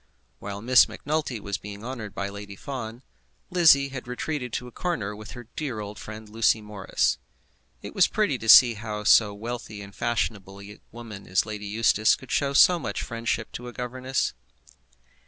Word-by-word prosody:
While 100 +1 -6
Miss 125 +1 +6
Macnulty 150 -5 -3
was 100 -2 -4
being 105 +1 -9
honoured 120 -5 -6
by 100 - -2
Lady 100 0 -8
Fawn, 120 0 -7 0.5
Lizzie 155 -6 +5
had 130 -2 -7
retreated 125 +1 -4
to 125 - -3
a - - -11
corner 115 - -3
with 105 +1 -10
her 120 - -8
old 120 - -21
dear 110 -9 -4
friend 110 +1 -9
Lucy 110 +1 +2
Morris. 105 -2 -1 0.6
It - - -7
was - - +5
pretty - - 0
to 115 - -4
see 120 +1 +10
how 105 -1 -5
so 105 0 +6
wealthy 115 -1 -6
and 100 -1 -10
fashionable 100 -4 -2
a 100 +1 -11
woman 110 -4 -10
as 95 +2 +2
Lady 105 -1 -6
Eustace 110 0 +3
could 130 - -13
show 140 -1 +1
so 175 +5 +6
much - - -4
friendship 115 -2 -3
to 125 - -7
a 120 - -8
governess. 130 +1 -2
110 Hz, 175 wpm, -26 LUFS, 105-125 Hz, 0.6 s, see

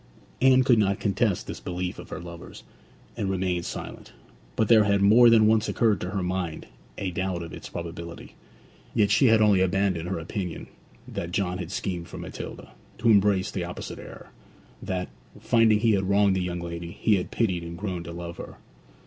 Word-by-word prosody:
Anne 130 0 +6
could 125 -3 +4
not 100 -2 +1
contest 100 -1 0
this - - -7
belief 90 0 -4
of - - -10
her - - -6
lover's, 85 0 -10 0.5
and 100 - -2
remained 90 -2 -1
silent; - - -8 0.4
but 110 - +1
there 110 -2 +6
had 100 -1 +2
more 110 +5 +7
than 115 -2 +6
once 110 +1 +3
occurred 110 -6 +2
to 90 - -3
her 95 -1 -2
mind 90 -3 -3 0.3
a 95 -2 -3
doubt 90 -1 -2
of 85 - -9
its - - -9
probability. 85 0 -7 0.6
Yet 105 -3 +3
she 135 - +5
had 110 -1 +5
only 100 -3 +4
abandoned 95 -2 0
her 95 - -2
opinion 90 +1 -5 0.4
that 85 - -5
John 90 -1 -1
had 85 -3 -5
schemed 90 -3 -3
for - - -9
Matilda, - - -8 0.3
to 115 +1 +1
embrace 100 -2 +3
the 90 - -3
opposite 90 - -7
error; - - -11 0.5
that, 90 -1 -3 0.3
finding 110 -2 +3
he 115 -1 +4
had 95 -2 +1
wronged 100 -1 +4
the 95 - 0
young 90 -1 -3
lady, 85 0 -6
he 105 -2 +3
had 90 - -4
pitied 95 -7 0
and 85 0 -7
grown 95 -2 -4
to 85 - -7
love 85 0 -7
her. - - -9
95 Hz, 190 wpm, -26 LUFS, 85-105 Hz, 0.6 s, more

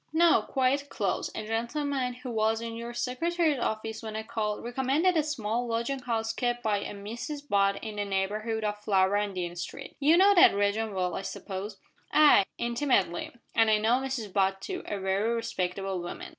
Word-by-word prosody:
"No, 335 +1 +5
quite 275 +2 0
close. - - -1
A 215 - -4
gentleman, 250 +3 -1
who 250 0 -7
was 220 0 +1
in 230 0 -5
your 235 +1 -6
Secretary's 300 +5 0
office 220 -1 -3
when 220 -1 -6
I 220 - -3
called, 220 -2 -3
recommended 270 +9 +1
a 315 - +4
small 245 -5 -2
lodging 235 +4 -1
house 225 -2 -2
kept 240 0 -1
by 210 -2 +1
a - - -5
Mrs 240 +9 -6
Butt 200 -2 +2
in 215 -2 -6
the 205 - -1
neighbourhood 210 +3 -1
of 210 0 -2
Flower 195 -1 +3
and 205 -2 -2
Dean 175 -1 -3
Street. 175 - -7
You 305 +4 +5
know 395 +2 +6
that 350 - +7
region 205 +1 0
well, 180 -2 0
I - - -3
suppose?" 195 +1 -6 0.3
"Ay 300 -10 +6
intimately; 235 -8 0 0.2
and 225 -1 +4
I 215 - +5
know 225 +4 +2
Mrs 255 -7 -4
Butt 195 -1 +2
too 195 - -5
a 205 - -2
very 195 +4 0
respectable 195 -4 -2
woman. 175 - -7
225 Hz, 185 wpm, -28 LUFS, 200-255 Hz, 0.3 s, that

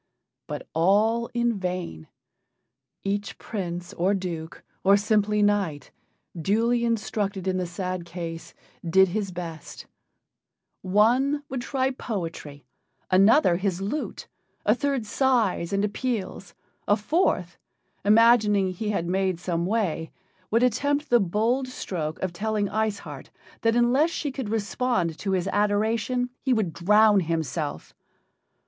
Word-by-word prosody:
But - - -6
all 210 +8 +2
in 240 -3 0
vain. 180 - -4 1.0
Each 200 +1 -3
prince, 175 -4 -5
or 190 +4 +1
duke, 170 -4 -5 0.2
or 195 +1 +6
simple 210 0 +1
knight, 200 -8 0 0.4
duly 225 +8 +1
instructed 205 -4 -1
in 185 0 +1
the 180 -1 -2
sad 180 0 -4
case, 170 -1 -7 0.3
did 190 +3 +4
his 200 +1 -2
best: 170 -3 -8 1.0
one 245 +10 +2
would 260 -1 -3
try 265 0 0
poetry, 165 - -6 0.5
another 195 - +5
his 190 -1 -1
lute, 220 +4 -4 0.4
a 210 - +5
third 275 -2 -1
sighs 225 -7 +1
and 200 +1 +1
appeals, 210 -3 -4 0.3
a 205 - +4
fourth, 205 - 0 0.4
imagining 210 -2 +5
he 210 +4 -4
had 195 -5 -1
made 185 0 0
some 175 -1 -2
way, 185 -7 -1 0.4
would 230 +3 +2
attempt 285 +4 +1
the 240 - +6
bold 225 +7 0
stroke 165 -10 -4
of 185 -2 -2
telling 210 +2 -1
Ice 215 0 0
Heart - - -10 0.3
that 225 0 +2
unless 250 +7 +3
she 310 -3 -3
could 265 -5 -5
respond 215 -5 -1
to 195 -1 -1
his 185 0 0
adoration 220 +4 0
he 260 - +1
would 210 -8 0
drown 210 +3 +5
himself. 160 - -3
205 Hz, 130 wpm, -25 LUFS, 180-230 Hz, 1.0 s, or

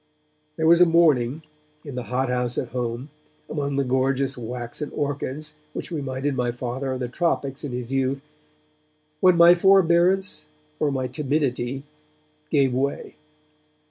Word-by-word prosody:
There 160 - -1
was 170 +2 +6
a 180 - +8
morning, 155 -4 +3 0.4
in 145 - -7
the 125 -1 -4
hot 130 +1 0
house 125 -1 -1
at - - -2
home, 125 +2 -4 0.4
among 140 -2 -2
the 140 - +1
gorgeous 135 +1 0
waxen 120 +4 -5
orchids 145 +1 -3 0.2
which - - -6
reminded 140 -2 -2
my 125 -1 0
Father 125 +2 -4
of 130 - -3
the 125 - -2
tropics 140 -1 -1
in 145 - -4
his 125 0 -5
youth, 135 0 0 1.0
when 185 0 +5
my 170 +1 +8
forbearance 185 - +3 0.3
or 145 - +1
my 130 -1 -1
timidity 135 -2 -1 0.7
gave 135 -4 +2
way. 140 +2 -2
135 Hz, 140 wpm, -24 LUFS, 125-155 Hz, 1.0 s, a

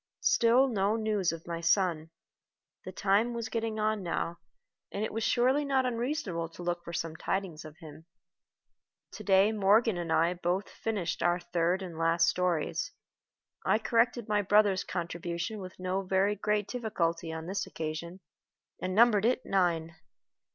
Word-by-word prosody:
Still 240 +3 +4
no 210 -3 +1
news 215 -5 0
of 165 0 -8
my 170 -1 -4
son. 165 -2 +1 0.8
The 185 - -6
time 205 +5 +1
was 230 -1 -4
getting 225 -1 -2
on 215 -1 0
now, 170 -1 -3 0.5
and 205 +2 -2
it - - -6
was 225 0 -2
surely 260 +6 +2
not 270 -2 +1
unreasonable 235 - -2
to 175 - -10
look 175 0 -2
for 170 - -7
some 165 -1 -3
tidings 180 -2 -3
of 155 0 -11
him. 160 0 -13 1.0
To - - -9
day 195 +1 +4
Morgan 215 0 +3
and 170 -2 -4
I 165 +2 +3
both 180 +2 -1
finished 195 -7 -3
our 175 0 +2
third 175 +2 0
and 170 -3 -7
last 165 0 +3
stories. 175 - 0 0.7
I - - +3
corrected 230 0 +1
my 210 -1 +2
brother's 205 -1 +3
contribution 170 +3 -4
with 185 -2 -9
no 185 +1 -1
very 195 +2 +1
great 210 0 0
difficulty 170 -9 -2
on 160 0 -6
this 190 +2 -3
occasion, 165 +3 -5 0.6
and 185 0 -2
numbered 220 -2 +5
it 255 +2 +1
Nine. 165 -4 0
190 Hz, 160 wpm, -30 LUFS, 170-215 Hz, 1.0 s, numbered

